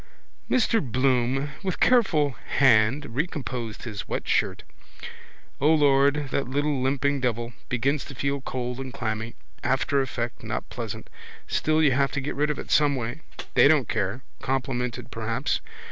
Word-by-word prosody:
Mr 230 Hz, -2 st, +3 dB
Bloom 130 Hz, +2 st, +1 dB
with 190 Hz, -2 st, -3 dB
careful 185 Hz, -, +4 dB, 0.3 s
hand 120 Hz, +1 st, +4 dB
recomposed 130 Hz, -7 st, -3 dB
his 105 Hz, -4 st, -6 dB
wet -, -, -3 dB
shirt. -, -, +1 dB, 1.0 s
O 150 Hz, +3 st, +4 dB
Lord, 145 Hz, -1 st, +4 dB
that 135 Hz, -, 0 dB
little 145 Hz, +1 st, 0 dB
limping 140 Hz, +2 st, +1 dB
devil. 120 Hz, -1 st, -1 dB, 0.2 s
Begins 130 Hz, +3 st, 0 dB
to 135 Hz, -, -9 dB
feel 140 Hz, +2 st, -1 dB
cold 125 Hz, -1 st, -4 dB
and 130 Hz, -1 st, -5 dB
clammy. 110 Hz, 0 st, -3 dB, 0.3 s
Aftereffect 130 Hz, -2 st, 0 dB
not -, -, -4 dB
pleasant. -, -, -5 dB, 0.4 s
Still 155 Hz, 0 st, +2 dB
you 145 Hz, -, +5 dB
have 135 Hz, +1 st, +2 dB
to 140 Hz, -, 0 dB
get 140 Hz, +2 st, -3 dB
rid 150 Hz, +1 st, 0 dB
of 150 Hz, -, -1 dB
it -, -, -7 dB
someway. 140 Hz, -2 st, +2 dB, 0.3 s
They -, -, +7 dB
don't 145 Hz, -6 st, +4 dB
care. 105 Hz, +4 st, -2 dB, 0.2 s
Complimented 125 Hz, -2 st, -2 dB
perhaps. -, -, -1 dB
135 Hz, 145 wpm, -26 LUFS, 125-145 Hz, 1.0 s, They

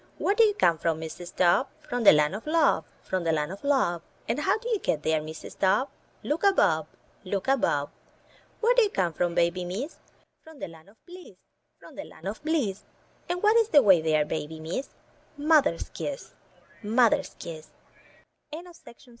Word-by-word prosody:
Where 400 Hz, -, +1 dB
do 455 Hz, -, +5 dB
you 420 Hz, -2 st, +3 dB
come 170 Hz, -, +2 dB
from, 165 Hz, -1 st, -1 dB
Mrs. 165 Hz, +2 st, -8 dB
Dove? 175 Hz, -1 st, +3 dB, 0.2 s
"From 245 Hz, -1 st, -2 dB
the 205 Hz, -, +9 dB
land 150 Hz, +2 st, +3 dB
of 215 Hz, +8 st, -7 dB
Love, 330 Hz, +1 st, +2 dB, 0.2 s
from 185 Hz, -2 st, -2 dB
the 165 Hz, -, +1 dB
land 150 Hz, 0 st, -1 dB
of 195 Hz, -, -9 dB
Love." 265 Hz, -, +1 dB, 0.3 s
And 230 Hz, +5 st, -1 dB
how 380 Hz, +7 st, +1 dB
do 460 Hz, +2 st, -9 dB
you 445 Hz, -4 st, +1 dB
get 150 Hz, -, -1 dB
there, 160 Hz, -1 st, +1 dB
Mrs. 155 Hz, +1 st, -10 dB
Dove? 195 Hz, +8 st, +2 dB, 0.3 s
"Look 305 Hz, +5 st, -2 dB
above 185 Hz, -, +3 dB, 0.2 s
— -, -, -34 dB
look 195 Hz, +2 st, -3 dB
above." 190 Hz, -, +1 dB, 0.7 s
Where 470 Hz, +2 st, +4 dB
do -, -, +5 dB
you 425 Hz, -, +3 dB
come 180 Hz, -, -1 dB
from, 170 Hz, +2 st, -1 dB
Baby 170 Hz, +1 st, +1 dB
Miss? 205 Hz, -, -5 dB, 0.4 s
"From 320 Hz, -1 st, -14 dB
the -, -, -6 dB
land 165 Hz, +1 st, -15 dB
of 215 Hz, -, -26 dB
Bliss, 360 Hz, 0 st, -13 dB, 0.4 s
from -, -, -15 dB
the -, -, -7 dB
land -, -, -11 dB
of -, -, -6 dB
Bliss." 280 Hz, -12 st, -1 dB, 0.5 s
And 360 Hz, +2 st, -2 dB
what 425 Hz, +2 st, +5 dB
is 455 Hz, -1 st, +3 dB
the 290 Hz, -8 st, +6 dB
way 190 Hz, -6 st, +6 dB
there, 155 Hz, -1 st, +2 dB
Baby 155 Hz, +1 st, -5 dB
Miss? 165 Hz, +12 st, -4 dB, 0.5 s
"Mother's 300 Hz, 0 st, +2 dB
kiss -, -, -6 dB, 0.3 s
— -, -, -28 dB
mother's 230 Hz, +2 st, +2 dB
kiss." 160 Hz, -2 st, -8 dB
195 Hz, 190 wpm, -27 LUFS, -, 0.7 s, the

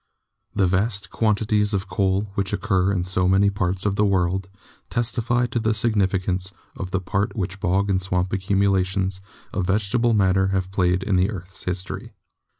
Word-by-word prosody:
The 95 Hz, -, +3 dB
vast 95 Hz, +3 st, 0 dB
quantities 105 Hz, -1 st, +1 dB
of 100 Hz, +1 st, -2 dB
coal 95 Hz, +1 st, +1 dB
which 100 Hz, -1 st, -2 dB
occur 95 Hz, -2 st, +1 dB
in 90 Hz, -3 st, 0 dB
so 90 Hz, 0 st, +1 dB
many 100 Hz, +2 st, +4 dB
parts 95 Hz, -1 st, -1 dB
of 100 Hz, -1 st, 0 dB
the 105 Hz, -, +3 dB
world 95 Hz, -1 st, +1 dB, 0.4 s
testify 120 Hz, 0 st, +1 dB
to 120 Hz, 0 st, -2 dB
the 110 Hz, -1 st, +1 dB
significance 95 Hz, -4 st, 0 dB, 0.2 s
of 95 Hz, -, -5 dB
the 95 Hz, -, 0 dB
part 95 Hz, +2 st, -1 dB
which 95 Hz, -2 st, -3 dB
bog 100 Hz, +1 st, +1 dB
and 95 Hz, -2 st, +1 dB
swamp 90 Hz, -1 st, -1 dB
accumulations 95 Hz, -1 st, +1 dB, 0.3 s
of 90 Hz, -2 st, -1 dB
vegetable 110 Hz, +4 st, +2 dB
matter 95 Hz, -1 st, +3 dB
have 95 Hz, -1 st, -1 dB
played 90 Hz, -1 st, +1 dB
in 95 Hz, -2 st, +1 dB
the 90 Hz, +2 st, +3 dB
earth's 95 Hz, -3 st, -8 dB
history. 90 Hz, +1 st, -4 dB
95 Hz, 165 wpm, -23 LUFS, 95-105 Hz, 0.4 s, many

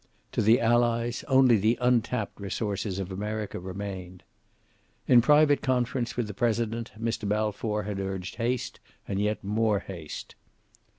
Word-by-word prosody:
To -, -, 0 dB
the 110 Hz, +4 st, +5 dB
Allies 120 Hz, 0 st, +1 dB
only 130 Hz, -3 st, +5 dB
the 110 Hz, +4 st, +2 dB
untapped 120 Hz, -4 st, 0 dB
resources 100 Hz, -1 st, -3 dB
of 95 Hz, -1 st, -4 dB
America 105 Hz, +2 st, -4 dB
remained. 95 Hz, -1 st, -7 dB, 0.8 s
In 125 Hz, -2 st, +7 dB
private 145 Hz, +3 st, +5 dB
conference 125 Hz, -3 st, -1 dB
with 120 Hz, -, 0 dB
the 105 Hz, -, -6 dB
President 115 Hz, +1 st, -1 dB
Mr. 115 Hz, -2 st, -2 dB
Balfour 105 Hz, 0 st, -1 dB
had 100 Hz, -1 st, -4 dB
urged 95 Hz, -1 st, -4 dB
haste, 120 Hz, +1 st, -2 dB, 0.3 s
and 100 Hz, -, -2 dB
yet 105 Hz, +1 st, -1 dB
more 105 Hz, +1 st, +1 dB
haste. 85 Hz, -6 st, -8 dB
110 Hz, 135 wpm, -27 LUFS, 100-120 Hz, 0.8 s, In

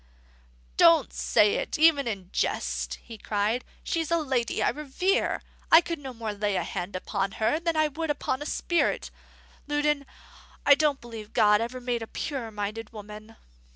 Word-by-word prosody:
"Don't 60 Hz, -, +5 dB
say 65 Hz, -, +3 dB
it -, -, -2 dB
even 305 Hz, -4 st, +5 dB
in 195 Hz, -5 st, -5 dB
jest," -, -, -1 dB
he 225 Hz, -2 st, -10 dB
cried. 215 Hz, +5 st, 0 dB, 0.2 s
"She's 330 Hz, -3 st, -1 dB
a 335 Hz, -, +3 dB
lady 260 Hz, -7 st, 0 dB
I -, -, +3 dB
revere. 300 Hz, -, 0 dB, 0.3 s
I 325 Hz, -, +10 dB
could 335 Hz, -2 st, -4 dB
no 270 Hz, -2 st, -7 dB
more 225 Hz, -3 st, -4 dB
lay 205 Hz, -1 st, -1 dB
a -, -, 0 dB
hand 185 Hz, 0 st, -5 dB
upon 195 Hz, +1 st, -2 dB
her 220 Hz, +9 st, +1 dB
than 335 Hz, -1 st, -1 dB
I 310 Hz, 0 st, +4 dB
could 315 Hz, +2 st, -4 dB
upon 290 Hz, -2 st, -1 dB
a 295 Hz, -, -4 dB
spirit. 345 Hz, +1 st, 0 dB, 0.6 s
Loudon, 295 Hz, -1 st, 0 dB, 0.6 s
I 285 Hz, -, +9 dB
don't 290 Hz, -1 st, +2 dB
believe 225 Hz, -3 st, -9 dB
God 210 Hz, 0 st, +5 dB
ever 245 Hz, +2 st, -4 dB
made 245 Hz, -1 st, -2 dB
a 225 Hz, -, -5 dB
purer 265 Hz, -4 st, -4 dB
minded 210 Hz, +1 st, -5 dB
woman." 215 Hz, +1 st, -10 dB
240 Hz, 170 wpm, -27 LUFS, 210-295 Hz, 0.6 s, I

